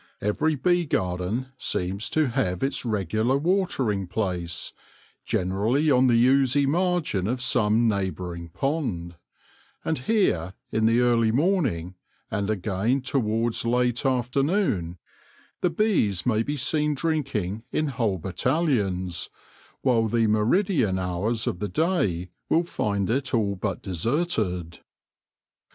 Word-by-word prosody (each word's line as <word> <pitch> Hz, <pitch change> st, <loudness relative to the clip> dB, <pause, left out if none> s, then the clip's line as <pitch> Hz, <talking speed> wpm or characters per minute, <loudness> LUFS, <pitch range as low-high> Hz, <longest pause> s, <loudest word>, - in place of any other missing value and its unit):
Every 150 Hz, +10 st, 0 dB
bee 175 Hz, +5 st, +1 dB
garden 95 Hz, +6 st, -1 dB
seems 95 Hz, +4 st, -2 dB
to 155 Hz, -4 st, +1 dB
have 115 Hz, -7 st, -1 dB
its 135 Hz, -, -1 dB
regular 110 Hz, +3 st, 0 dB
watering 140 Hz, -, 0 dB
place, 90 Hz, -5 st, -3 dB, 0.5 s
generally 110 Hz, -, +1 dB
on 130 Hz, 0 st, +5 dB
the 120 Hz, -2 st, +4 dB
oozy 135 Hz, +1 st, +4 dB
margin 165 Hz, -, 0 dB
of 125 Hz, +3 st, -1 dB
some 115 Hz, -2 st, +2 dB
neigh 100 Hz, -3 st, +1 dB
bouring 85 Hz, -2 st, -7 dB
pond; 110 Hz, -, -2 dB, 0.7 s
and 160 Hz, -, 0 dB
here, 110 Hz, -, +1 dB, 0.2 s
in 110 Hz, 0 st, +2 dB
the 115 Hz, +2 st, +3 dB
early 115 Hz, -2 st, +3 dB
morning, 130 Hz, -, +1 dB, 0.4 s
and 100 Hz, 0 st, -1 dB
again 110 Hz, +5 st, 0 dB
towards 115 Hz, -3 st, 0 dB
late 125 Hz, +1 st, +1 dB
afternoon, 130 Hz, -, 0 dB, 0.6 s
the 180 Hz, -, +3 dB
bees 165 Hz, -, +1 dB
may 110 Hz, -3 st, +2 dB
be 145 Hz, +5 st, -2 dB
seen 150 Hz, +3 st, +1 dB
drinking 135 Hz, -, -2 dB
in 155 Hz, -1 st, 0 dB
whole 115 Hz, -7 st, 0 dB
battalions, 95 Hz, -, -1 dB, 0.5 s
while 115 Hz, -4 st, +3 dB
the 115 Hz, +1 st, +2 dB
meridian 110 Hz, -, +2 dB
hours 95 Hz, +5 st, -1 dB
of 90 Hz, -, -2 dB
the 105 Hz, -, -3 dB
day 95 Hz, -, 0 dB, 0.2 s
will 165 Hz, -, +3 dB
find 100 Hz, -, -1 dB
it 130 Hz, +1 st, 0 dB
all 100 Hz, -3 st, +1 dB
but 95 Hz, 0 st, -3 dB
deserted. 95 Hz, -, -1 dB
115 Hz, 125 wpm, -25 LUFS, 95-140 Hz, 0.7 s, on